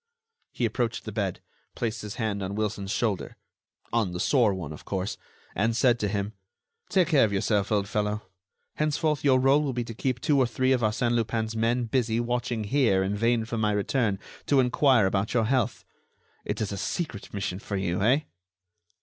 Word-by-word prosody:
He 120 Hz, -, -1 dB
approached 115 Hz, +1 st, -1 dB
the 110 Hz, -, -5 dB
bed, 100 Hz, -3 st, -2 dB, 0.3 s
placed 115 Hz, -1 st, -2 dB
his 105 Hz, -1 st, -6 dB
hand 110 Hz, -3 st, -2 dB
on 95 Hz, +1 st, -3 dB
Wilson's 105 Hz, -2 st, -2 dB
shoulder—on 105 Hz, -1 st, -3 dB
the 90 Hz, -, -4 dB
sore 120 Hz, -3 st, +3 dB
one, 85 Hz, -6 st, -5 dB
of 75 Hz, -, -11 dB
course—and 100 Hz, +3 st, -3 dB
said 120 Hz, 0 st, +3 dB
to 105 Hz, -, 0 dB
him: 100 Hz, +1 st, -2 dB, 0.6 s
"Take 180 Hz, -4 st, +3 dB
care 150 Hz, -6 st, +5 dB
of 110 Hz, -, +2 dB
yourself, 100 Hz, +1 st, 0 dB
old 100 Hz, -2 st, +1 dB
fellow. 105 Hz, -1 st, -1 dB, 0.5 s
Henceforth 150 Hz, -1 st, 0 dB
your 130 Hz, -3 st, +5 dB
rôle 135 Hz, +3 st, +4 dB
will 140 Hz, -3 st, -1 dB
be 120 Hz, 0 st, -1 dB
to 115 Hz, -, -7 dB
keep 125 Hz, +2 st, -1 dB
two 145 Hz, +3 st, +2 dB
or 130 Hz, -, +4 dB
three 130 Hz, +3 st, +1 dB
of 130 Hz, -2 st, +3 dB
Arsène 115 Hz, +2 st, +1 dB
Lupin's 115 Hz, -1 st, -1 dB
men 115 Hz, +2 st, +1 dB
busy 115 Hz, -1 st, 0 dB
watching 120 Hz, -1 st, -1 dB
here 110 Hz, -5 st, +2 dB
in 100 Hz, +2 st, -1 dB
vain 115 Hz, +1 st, +1 dB
for 115 Hz, 0 st, -3 dB
my 105 Hz, -1 st, +2 dB
return 105 Hz, 0 st, +1 dB, 0.3 s
to 140 Hz, -, +4 dB
enquire 125 Hz, -2 st, +4 dB
about 95 Hz, +4 st, 0 dB
your 115 Hz, -2 st, +3 dB
health. 120 Hz, -2 st, 0 dB, 0.6 s
It -, -, -3 dB
is 105 Hz, -, -1 dB
a 100 Hz, -, -4 dB
secret 125 Hz, -, -4 dB
mission 95 Hz, -2 st, -3 dB
for 100 Hz, -2 st, -4 dB
you, 95 Hz, -1 st, -1 dB
eh?" 125 Hz, +8 st, +4 dB
115 Hz, 185 wpm, -27 LUFS, 100-125 Hz, 0.6 s, care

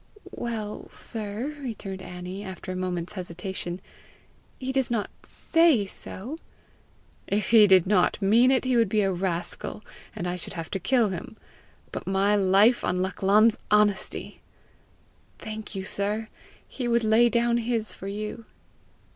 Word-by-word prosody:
"Well, 220 Hz, -3 st, -5 dB
sir," 225 Hz, +7 st, -6 dB
returned 205 Hz, -7 st, -5 dB
Annie, 180 Hz, +2 st, -7 dB
after 190 Hz, -1 st, -7 dB
a -, -, -4 dB
moment's 180 Hz, -1 st, -3 dB
hesitation, 180 Hz, -1 st, -5 dB, 0.8 s
"he 260 Hz, 0 st, -3 dB
does 265 Hz, -1 st, +1 dB
not 230 Hz, -4 st, -1 dB
SAY 325 Hz, -10 st, +3 dB
so!" 235 Hz, -, -7 dB, 0.9 s
"If 205 Hz, 0 st, 0 dB
he 220 Hz, -3 st, +8 dB
did 190 Hz, -3 st, +6 dB
not 185 Hz, -2 st, +2 dB
mean 225 Hz, +5 st, +5 dB
it, 260 Hz, -1 st, +2 dB
he 255 Hz, -1 st, +2 dB
would 230 Hz, -4 st, +3 dB
be 215 Hz, +1 st, +2 dB
a 195 Hz, -1 st, +1 dB
rascal, 180 Hz, +3 st, -3 dB, 0.3 s
and 175 Hz, -, -3 dB
I 180 Hz, 0 st, -2 dB
should 175 Hz, -, -5 dB
have 165 Hz, -2 st, -6 dB
to 195 Hz, -, -2 dB
kill 230 Hz, +3 st, +2 dB
him. 190 Hz, +5 st, -7 dB, 0.5 s
But -, -, -6 dB
my 195 Hz, +2 st, +2 dB
life 200 Hz, +4 st, +4 dB
on 180 Hz, +1 st, 0 dB
Lachlan's 205 Hz, +4 st, +3 dB
honesty!" 210 Hz, -2 st, +1 dB, 1.0 s
"Thank 215 Hz, -1 st, -7 dB
you, 190 Hz, -, -3 dB
sir. 210 Hz, +3 st, -1 dB, 0.4 s
He 250 Hz, -3 st, -4 dB
would 235 Hz, -1 st, +2 dB
lay 220 Hz, +2 st, +5 dB
down 235 Hz, 0 st, +2 dB
his 230 Hz, -2 st, -1 dB
for 195 Hz, -, -8 dB
you." 210 Hz, +3 st, -5 dB
210 Hz, 145 wpm, -26 LUFS, 190-235 Hz, 1.0 s, he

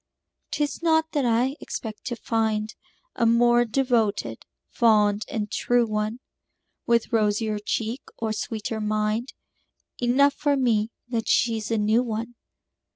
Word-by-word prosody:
'Tis 295 Hz, 0 st, -2 dB
not 320 Hz, -1 st, +2 dB
that 290 Hz, -4 st, 0 dB
I 245 Hz, +4 st, +2 dB
expect 215 Hz, -2 st, -7 dB
to 240 Hz, -, -3 dB
find 220 Hz, -1 st, -1 dB, 0.4 s
A 235 Hz, -, +2 dB
more 240 Hz, +1 st, +4 dB
devoted, 230 Hz, -3 st, 0 dB, 0.2 s
fond 210 Hz, -3 st, +3 dB
and 210 Hz, -2 st, -3 dB
true 245 Hz, -1 st, +2 dB
one, 215 Hz, +2 st, -2 dB, 0.7 s
With 235 Hz, 0 st, +1 dB
rosier 215 Hz, -1 st, +1 dB
cheek 225 Hz, +4 st, -2 dB, 0.2 s
or 220 Hz, -1 st, -2 dB
sweeter 220 Hz, +1 st, -4 dB
mind 215 Hz, +3 st, -1 dB, 0.7 s
Enough 270 Hz, +4 st, +4 dB
for 285 Hz, -1 st, +1 dB
me 225 Hz, -4 st, +2 dB, 0.2 s
that 230 Hz, -2 st, -2 dB
she's 225 Hz, -2 st, +1 dB
a 225 Hz, -, +1 dB
new 215 Hz, +3 st, +3 dB
one. 230 Hz, 0 st, -4 dB
230 Hz, 130 wpm, -25 LUFS, 215-245 Hz, 0.7 s, more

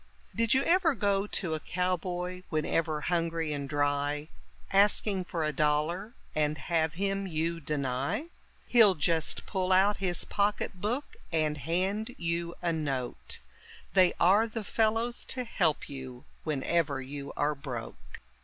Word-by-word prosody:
Did 230 Hz, +1 st, +3 dB
you 265 Hz, -, +3 dB
ever 340 Hz, -4 st, +3 dB
go 200 Hz, -1 st, +1 dB
to 175 Hz, -5 st, -1 dB
a 155 Hz, -, -1 dB
cowboy 180 Hz, +1 st, -2 dB
whenever 155 Hz, -1 st, 0 dB
hungry 165 Hz, -2 st, 0 dB
and 140 Hz, -1 st, -4 dB
dry, 145 Hz, +1 st, 0 dB, 0.4 s
Asking 200 Hz, -1 st, +4 dB
for 170 Hz, -2 st, -3 dB
a 155 Hz, 0 st, 0 dB
dollar, 155 Hz, -, 0 dB, 0.2 s
and 150 Hz, 0 st, +1 dB
have 160 Hz, +1 st, 0 dB
him 195 Hz, +1 st, -1 dB
you 165 Hz, 0 st, -1 dB
deny? 140 Hz, -, -1 dB, 0.4 s
He'll 220 Hz, -6 st, +6 dB
just 160 Hz, 0 st, 0 dB
pull 190 Hz, -2 st, -1 dB
out 195 Hz, +2 st, +5 dB
his 180 Hz, -3 st, 0 dB
pocket 200 Hz, -2 st, -1 dB
book 245 Hz, +8 st, -2 dB
and 155 Hz, -2 st, +1 dB
hand 190 Hz, -, -1 dB
you 170 Hz, 0 st, -2 dB
a 170 Hz, -1 st, +1 dB
note, 135 Hz, -6 st, -3 dB, 0.6 s
They 185 Hz, -2 st, +5 dB
are 200 Hz, +6 st, +5 dB
the 225 Hz, 0 st, -5 dB
fellows 225 Hz, +3 st, 0 dB
to 255 Hz, -, +1 dB
help 180 Hz, -10 st, 0 dB
you 130 Hz, -3 st, -8 dB, 0.2 s
whenever 150 Hz, 0 st, 0 dB
you 140 Hz, +2 st, -6 dB
are 150 Hz, +1 st, +2 dB
broke. 130 Hz, -5 st, -8 dB
170 Hz, 140 wpm, -30 LUFS, 150-200 Hz, 0.6 s, He'll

